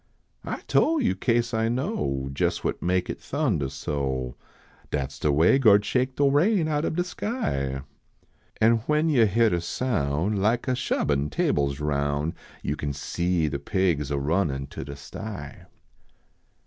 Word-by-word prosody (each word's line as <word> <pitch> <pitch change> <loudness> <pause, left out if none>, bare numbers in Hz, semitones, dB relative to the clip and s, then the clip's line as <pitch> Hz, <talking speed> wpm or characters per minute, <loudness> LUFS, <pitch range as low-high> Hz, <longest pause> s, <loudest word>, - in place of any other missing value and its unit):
I - - -4
tole 325 0 +2
yo 235 - +2
kase 120 -1 0
I 110 0 +1
know, 115 - -2
Jes - - 0
what - - -2
make 90 0 +1
it - - -5
thundah 110 - -1
so, 65 -3 -3 0.5
Dat 70 -2 -2
s - - -12
de 75 - +2
way 80 - +4
Gord 105 -5 +5
shake 130 +2 0
de 145 - +1
rain 160 +6 +3
out 150 0 0
ob - - -1
de 175 - +1
skv; 70 - -2 0.8
An 115 +1 +5
when 150 +2 +2
yo 120 -7 +5
hyar 115 +2 +3
de 85 - 0
soun 85 - -1
Like 110 +6 +1
a 130 - +2
shubbin" 75 - 0
tables 70 -1 0
roun 70 +1 0 0.3
Yo 70 - -1
can 70 -1 -3
see 85 +3 0
de 70 -1 -3
pigs 80 -2 0
a 70 - -1
runnin 70 -2 0
to - - -6
de 70 +1 -7
sty. 70 +2 -8
90 Hz, 160 wpm, -26 LUFS, -, 0.8 s, Gord